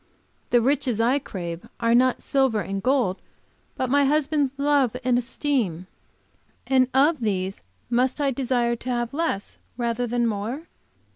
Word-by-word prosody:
The 240 - +4
riches 255 -2 +1
I 245 +5 +3
crave 175 -9 -6
are 230 0 +2
not 255 +1 +3
silver 265 -6 +2
and 195 0 -4
gold, 250 -7 +1 0.6
but 255 - 0
my 285 +2 +3
husband's 290 -1 +1
love 280 -4 +2
and 250 -1 +2
esteem. 240 - -1 0.8
And 260 -1 +3
of 290 +4 +3
these 195 -4 -2 0.3
must 250 +3 +1
I 280 -2 +1
desire 240 -2 0
to 250 - -7
have 240 0 -1
less 290 -11 -2 0.2
rather 240 0 -1
than 240 +1 0
more? 225 +7 -3
250 Hz, 145 wpm, -24 LUFS, 230-275 Hz, 0.8 s, The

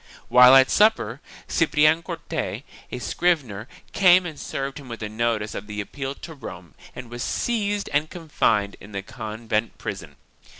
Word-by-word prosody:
While 125 +1 +8
at 135 0 +6
supper, 205 - +3 0.3
Ciprian 155 0 +3
Corte, 170 -2 -5 0.3
a - - -4
scrivener, 125 - -1 0.3
came 185 -1 +6
and 155 -4 -7
served 135 +1 -4
him 135 -3 -12
with 115 -1 -7
a 105 - -4
notice 110 -1 -1
of 105 - -6
the 105 0 -6
appeal 135 +6 -5
to 165 - -10
Rome 95 - -10 0.2
and 125 -2 -9
was 120 0 -6
seized 205 - -1
and 150 +2 +1
confined 115 - 0
in 100 +1 -13
the 100 -1 -4
convent 110 +2 -4
prison. - - -7
130 Hz, 160 wpm, -24 LUFS, 110-160 Hz, 0.3 s, While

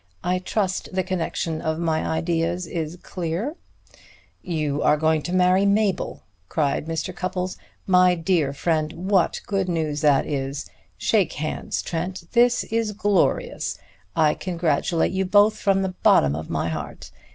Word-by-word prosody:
I 180 +1 +1
trust 190 0 -2
the 185 - +1
connection 165 -3 -2
of 160 +1 -1
ideas 165 +2 0
is 165 -1 -4
clear." 180 - -3 0.9
"You 155 -5 -2
are 150 - +4
going 160 0 +2
to 175 - -5
marry 185 +1 +4
Mabel!" 200 -2 +1 0.3
cried 150 0 0
Mr. 165 +3 -3
Cupples. 185 0 -3 0.3
"My 180 -1 +5
dear 165 -4 +1
friend, 155 +1 -1 0.2
what 190 -4 +2
good 195 -2 -1
news 155 -4 -1
this 145 -3 +4
is! 140 0 -3 0.3
Shake 200 -7 +2
hands, 155 +1 -3
Trent; 180 +2 -4
this 245 0 +4
is 225 -1 -1
glorious! 205 -2 0 0.4
I 155 -2 +4
congratulate 170 -2 0
you 190 +1 0
both 205 +3 +4
from 195 -1 +2
the 190 - 0
bottom 70 0 +5
of 80 +1 -6
my 85 0 -1
heart. 80 -3 -6
170 Hz, 140 wpm, -23 LUFS, 155-190 Hz, 0.9 s, My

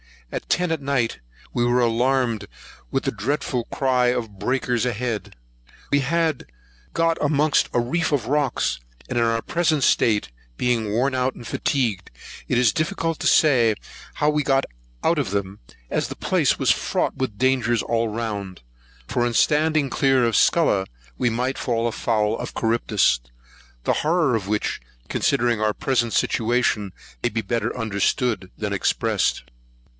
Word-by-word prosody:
At - - -5
ten 180 -1 +1
at 160 -2 -1
night 135 -4 0 0.3
we 120 - +1
were 120 +1 +3
alarmed 120 -2 +1 0.4
with - - -1
the - - 0
dreadful 120 +2 -2
cry 130 -2 +1
of 115 -5 -2
breakers 125 +1 0
ahead. 120 -2 -3 0.6
We 145 - +4
had 160 +1 0 0.5
got 165 0 +2
amongst 150 0 +2
a - - +3
reef 160 +9 -1
of 135 -7 0
rocks; 140 - 0 0.3
and 120 - 0
in - - +3
our 115 0 +1
present 160 -3 +1
state, 105 - +2 0.3
being 120 -4 0
worn 125 +6 +1
out 130 0 0
and 120 - -11
fatigued, 115 -11 -1 0.4
it 125 - +1
is 120 -3 +4
difficult 165 0 -1
to - - 0
say 120 -8 +4 0.4
how 150 - +2
we 150 0 +1
got 135 -1 +2 0.4
out 165 -2 +2
of 120 -9 -2
them, 100 -1 -3 0.3
as - - 0
the - - -7
place - - +1
was - - +3
fraught - - -1
with 130 -6 -3
danger 130 -1 +2
all 115 0 +1
round; 105 -4 -4 0.5
for 120 - 0
in 120 - -1
standing 150 +2 +2
clear 135 -2 +2
of 115 -2 +2
Scylla, 105 - +3 0.3
we 125 - +2
might 125 +4 -2
fall 115 -1 0
foul 110 -1 0
of - - -6
Charybdis; 110 - +2 0.6
the - - +2
horror 160 -3 +2
of 100 -4 -3
which, 105 0 -1 0.3
considering 120 -2 +1
our 110 0 +2
present 120 -2 0
situation, 115 -4 +1 0.3
may - - +1
be 115 +1 -2
better 115 +4 -2
understood 110 -1 0
than 105 -1 -3
expressed. 100 - 0
120 Hz, 155 wpm, -23 LUFS, 110-140 Hz, 0.6 s, We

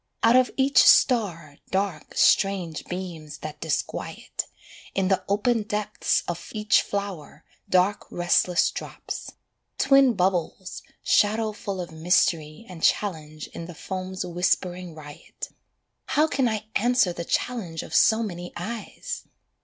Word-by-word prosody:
Out 230 +2 +6
of 255 0 +5
each 270 +1 +4
star, 175 - +4
dark, 190 -5 -2
strange 190 -6 +2
beams 170 -5 -6
that 155 -1 -7
disquiet: 160 -3 -3 0.5
In 190 -1 +1
the 190 - +2
open 220 +3 +2
depths 210 0 -1
of 175 -1 -5
each 215 0 +3
flower, 195 -7 -5 0.2
dark 185 +3 +2
restless 175 0 +2
drops: - - -7 0.4
Twin 270 -3 +5
bubbles, 185 0 -1 0.2
shadow 215 +1 +3
full 200 -2 -5
of 175 -2 -5
mystery 160 +1 +1
and 180 -3 -10
challenge 155 -7 0
in 165 - -6
the 175 - -9
foam's 185 +2 -5
whispering 180 0 -1
riot: 145 -2 -9 0.6
How 300 - +3
can 265 -5 +1
I 215 -1 -3
answer 235 -5 +3
the 170 - -5
challenge 175 -5 -2
of - - -10
so 225 +1 +5
many 175 -4 -6
eyes! 230 - -6
185 Hz, 130 wpm, -25 LUFS, 170-215 Hz, 0.6 s, Out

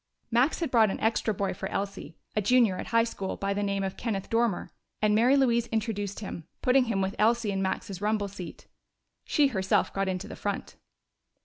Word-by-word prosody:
Max 250 +9 +2
had 330 - -1
brought 225 -3 +5
an - - -3
extra 225 0 +1
boy 200 -1 -1
for 185 - -5
Elsie, 195 -5 -4 0.2
a 215 - +2
junior 225 -2 +4
at - - -5
high 230 0 +4
school, 200 -4 -4
by 200 0 -1
the 205 - -2
name 200 -1 -1
of 190 -1 -3
Kenneth 205 -5 -3
Dormer, 230 -4 +1 0.3
and 215 0 +3
Mary 245 +6 +5
Louise 235 -3 +3
introduced 210 -3 -2
him, 170 -5 -7 0.2
putting 255 0 +4
him 220 -5 0
with 190 +1 -1
Elsie 225 0 +3
in 195 -1 -1
Max's 190 0 -3
rumble 210 -1 0
seat. 190 -4 -9 0.6
She 290 -2 +3
herself 190 -6 +1
got 195 0 0
into 190 +2 -3
the - - -8
front. 200 -1 -4
210 Hz, 200 wpm, -28 LUFS, 195-230 Hz, 0.6 s, brought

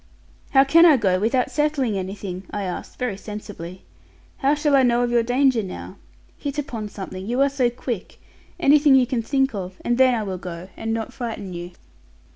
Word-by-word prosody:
'How 270 -1 +6
can 325 +5 +6
I 320 -5 +7
go 185 -5 +2
without 250 +5 +1
settling 280 -5 0
anything?' 190 -1 -5
I 205 - -4
asked 180 -2 -6
very 245 -6 -2
sensibly. 200 -4 -8 0.5
'How 280 +2 +2
shall 295 -1 +2
I 270 - +6
know 240 -1 +3
of 240 - 0
your 240 -1 +4
danger 250 0 +2
now? 190 -3 -8 0.4
Hit 285 0 -4
upon 230 -7 -4
something; 190 -2 -7
you 245 +3 -1
are 280 - +4
so 265 -3 +1
quick. 240 -4 -6 0.4
Anything 290 0 +5
you 260 -1 +5
can 245 -2 -1
think 270 +2 +1
of; 185 -2 -5
and 240 +1 +1
then 260 -1 +5
I 220 - -1
will 190 -3 -4
go, 175 +1 -7
and 225 - -4
not 225 0 -3
frighten 225 -7 -5
you.' 175 +1 -7
235 Hz, 195 wpm, -23 LUFS, 195-270 Hz, 0.5 s, I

